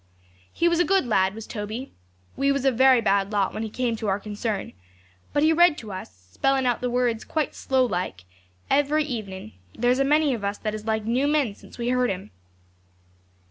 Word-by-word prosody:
'He 340 - +1
was 340 0 +2
a - - +5
good 385 -3 +2
lad, 190 -4 +2
was 225 0 -7
Toby. 220 +4 -6 0.4
We 275 0 +2
was 275 -1 -1
a 270 - +5
very 260 0 +5
bad 200 -1 +1
lot 200 -2 0
when - - -4
he 220 - -3
came 240 +1 -1
to 220 - -4
our 195 0 +1
concern; 210 0 -4 0.6
but 290 - +1
he 315 +1 +5
read 345 -1 +5
to 215 -3 -8
us, 95 - -9
spelling 270 - +1
out 245 -2 +1
the 250 - -1
words 240 -2 0
quite 310 -3 -2
slow 260 -1 +1
like, 180 - -3 0.4
every 290 +2 +2
evening; 200 - -6 0.2
and - - -10
there's 250 +2 +3
a - - +4
many 295 0 +3
of 225 -4 -5
us 200 +1 -2
that 215 -1 -3
is 215 0 -6
like 220 -1 0
new 250 +5 +1
men 290 -8 +1
since - - -16
we 240 0 -2
heard 250 0 +2
him. 190 0 -5
240 Hz, 215 wpm, -25 LUFS, 205-275 Hz, 0.6 s, a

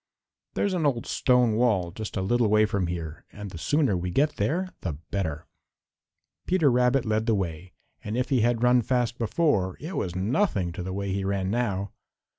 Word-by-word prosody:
There's 200 - 0
an 175 -3 0
old 120 -4 -1
stone 125 -3 +3
wall 105 -8 +2
just 110 +2 -6
a 95 - -1
little 120 +4 +2
way 110 +1 +4
from 100 -4 -1
here, 85 -2 -5
and 105 -2 -8
the 85 - -8
sooner 145 - +2
we 90 +1 -2
get 145 - +1
there 185 +5 0
the 85 - -3 0.2
better!" 80 -6 -2 1.0
Peter 170 -7 +3
Rabbit 125 +1 +2
led 110 +1 0
the 115 - +3
way, 90 -1 -4 0.3
and 105 +3 -3
if 125 - -1
he 130 -4 +3
had 120 +1 +1
run 125 0 +5
fast 120 0 -1
before 115 - +1
it 165 +6 -6
was 90 -2 -2
nothing 100 - 0
to 90 - -6
the 95 +1 -4
way 100 0 -3
he 100 0 -1
ran 95 -1 -1
now. 100 -4 -1
110 Hz, 195 wpm, -26 LUFS, 95-125 Hz, 1.0 s, run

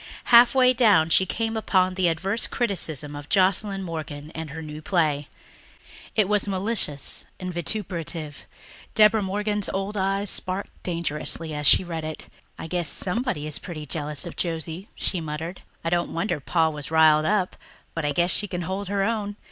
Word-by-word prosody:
Halfway 250 +2 +7
down 205 -10 +4
she 190 - +4
came 225 +2 -2
upon 185 -4 +2
an 185 -1 +1
adverse 190 +7 +2
criticism 160 - -1
of 145 0 -9
Joscelyn 195 +1 +2
Morgan 155 -3 -6
and 160 -1 -5
her 160 +3 -7
new 155 0 -7
play. 155 -4 +1 0.9
It 215 -3 +3
was 210 0 +1
malicious 190 -7 -3
and 185 -1 -4
vituperative. 170 -5 -4 0.5
Deborah 215 0 +6
Morgan's 205 +1 -1
old 195 +2 -3
eyes 195 +1 +1
sparkled 185 +1 -3
dangerously 165 -2 0
as 150 0 -1
she - - +6
read 165 -3 -5
it. 155 0 -6 0.3
"I - - -6
guess 175 0 0
somebody 215 - -1
is 155 -1 -3
pretty 155 -4 -7
jealous 150 +2 -3
of 170 - -7
Josie," 165 +2 -3
she 180 - -2
muttered. 160 +3 -5 0.2
"I 165 - -1
don't 175 0 0
wonder 170 -2 -1
Pa 160 +3 +2
was 150 -2 -7
riled 155 -1 +5
up. 200 -3 +1 0.4
But 165 - -3
I 145 - +1
guess 175 +4 +2
she 205 - +2
can 180 -2 -4
hold 190 +3 -3
her 200 0 0
own. 205 -1 -1
175 Hz, 170 wpm, -25 LUFS, 155-200 Hz, 0.9 s, Halfway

